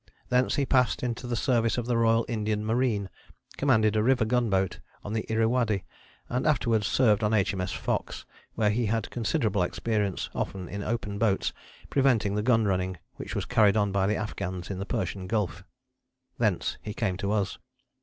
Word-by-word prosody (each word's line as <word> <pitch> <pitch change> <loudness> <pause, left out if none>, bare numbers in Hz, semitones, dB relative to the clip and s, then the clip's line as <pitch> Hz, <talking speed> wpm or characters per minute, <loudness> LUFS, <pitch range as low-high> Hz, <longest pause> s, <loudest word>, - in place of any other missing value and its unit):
Thence 125 0 +2
he 140 - +1
passed 125 -2 +2
into 120 0 -3
the 120 - -1
service 115 -1 +1
of 120 - -1
the 120 0 0
Royal 115 0 +3
Indian 105 -2 -1
Marine, 110 -3 +1 0.5
commanded 110 -6 +3
a 105 - +3
river 125 0 +3
gunboat 110 -6 +1 0.2
on 105 - -5
the 110 0 -3
Irrawaddy, 110 -2 +1 0.4
and 125 +4 -1
afterwards 115 -8 +2
served 110 -4 +3
on 105 +1 +2
H.M.S. 95 -3 0
Fox, - - -3 0.3
where 105 -2 +2
he 115 +1 0
had 115 +1 -1
considerable 105 -3 0
experience, 105 +2 -1
often 95 -2 -3
in 100 +3 -5
open 105 -2 -3
boats, 105 -3 +1 0.4
preventing 120 -7 +3
the 105 - 0
gun 115 -1 +3
running 95 -2 0 0.2
which - - -6
was - - -1
carried 105 -1 +4
on 100 -1 +2
by 95 0 +1
the 105 - +1
Afghans 95 -3 -4
in 95 - -4
the 100 - -4
Persian 95 -4 -3
Gulf. 100 -6 -1 0.8
Thence - - 0
he 105 - -6
came 100 -6 0
to 100 +1 -2
us. 105 -3 -1
110 Hz, 175 wpm, -27 LUFS, 100-115 Hz, 0.8 s, carried